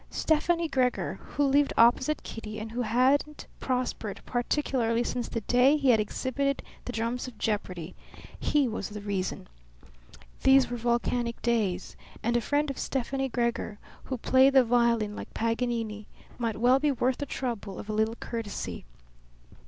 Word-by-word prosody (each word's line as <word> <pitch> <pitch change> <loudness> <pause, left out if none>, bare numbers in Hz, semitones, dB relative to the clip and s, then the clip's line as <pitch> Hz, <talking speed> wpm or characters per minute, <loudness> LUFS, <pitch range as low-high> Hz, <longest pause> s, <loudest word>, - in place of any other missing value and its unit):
Stefani 330 +2 +1
Gregor, 255 -4 0
who 290 - -1
lived 280 +1 +3
opposite 255 +6 +4
Kitty 215 -1 -7
and 220 +1 -6
who 245 +2 -2
hadn't 260 +6 +2
prospered 250 -5 -2
particularly 240 -2 0
since 245 0 -3
the 230 - -3
day 250 +6 +4
he 275 -3 +4
had 225 - +4
exhibited 270 +6 -1 0.2
the - - -3
drums 235 +2 -2
of 245 -4 -10
jeopardy 185 -6 -3 0.5
he 290 -3 +2
was 220 -4 -4
the 210 0 -7
reason. 200 -2 -3 0.9
These 265 -2 +5
were 245 - -2
volcanic 235 0 0
days, 210 -7 0 0.3
and 235 +1 +1
a 240 - +3
friend 290 +4 0
of 275 - -8
Stefani 270 +1 -2
Gregor 235 -3 -1 0.3
who 260 - -3
played 260 +3 +4
the 265 -2 +7
violin 235 -3 +2
like - - -8
Paganini 230 -2 -1 0.3
might 230 -3 -1
well 250 +4 +4
be 295 +1 +2
worth 255 -1 0
the 285 - -3
trouble 230 -7 -4
of - - -8
a 215 - -3
little 220 +1 +1
courtesy. 230 -3 -5
240 Hz, 155 wpm, -28 LUFS, 225-265 Hz, 0.9 s, the